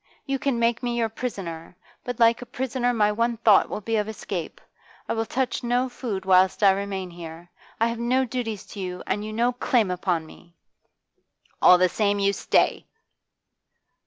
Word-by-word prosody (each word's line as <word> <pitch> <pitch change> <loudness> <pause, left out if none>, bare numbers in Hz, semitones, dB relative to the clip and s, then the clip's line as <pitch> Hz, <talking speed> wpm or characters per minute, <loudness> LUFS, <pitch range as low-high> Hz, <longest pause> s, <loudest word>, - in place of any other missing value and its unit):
You 275 -1 -2
can 270 -3 0
make 235 0 +1
me 240 -1 -2
your 230 -1 +1
prisoner, 180 -8 -6 0.3
but 245 -1 -5
like 230 0 +4
a 245 - -8
prisoner 250 0 -1
my 210 -3 +2
one 230 +2 0
thought 215 -3 +4
will - - -4
be 225 +2 -1
of 210 0 -1
escape. 190 -6 -5 0.5
I - - -1
will 225 0 -2
touch 260 0 -1
no 245 +2 +1
food 215 -6 -5
whilst 190 +2 +4
I 195 - +8
remain 195 -2 -3
here. 170 0 -10 0.3
I 225 - +3
have 230 0 -3
no 255 +3 +1
duties 225 -4 -4
to 205 - -8
you, 180 -1 -5
and 205 +2 -2
you 215 - -5
no 235 +3 +1
claim 240 -4 +1
upon 180 -3 -1
me!' 170 +2 -17 1.1
'All 180 - +8
the 185 +1 +4
same, 205 +2 0
you 200 0 +2
stay! - - +1
215 Hz, 185 wpm, -24 LUFS, 190-240 Hz, 1.1 s, I